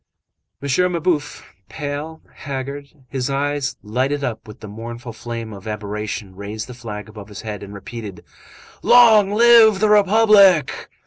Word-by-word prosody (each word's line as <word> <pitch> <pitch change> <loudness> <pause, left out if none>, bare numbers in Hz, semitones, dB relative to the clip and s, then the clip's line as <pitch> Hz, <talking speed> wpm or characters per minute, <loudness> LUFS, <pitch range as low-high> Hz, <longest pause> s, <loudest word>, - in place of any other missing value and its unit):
M. 180 +7 +1
Mabeuf, 160 -3 -2 0.3
pale, 150 +2 -6
haggard, 140 +1 -6 0.2
his 130 0 -3
eyes 145 0 -2
lighted 130 +7 -1
up 115 -4 -4
with 105 - -12
the 110 - -8
mournful 115 +3 -8
flame 115 -1 -7
of 100 +1 -11
aberration, 105 -2 -5
raised 105 +3 -6
the 125 - -10
flag 110 -4 -8
above 105 -2 -11
his 105 -2 -9
head 105 -3 -6
and 100 - -9
repeated:— 105 -1 -9 0.6
"Long 225 -5 +6
live 225 -2 +6
the 215 0 +2
Republic!" 205 -6 +4
130 Hz, 140 wpm, -20 LUFS, 110-170 Hz, 0.6 s, Long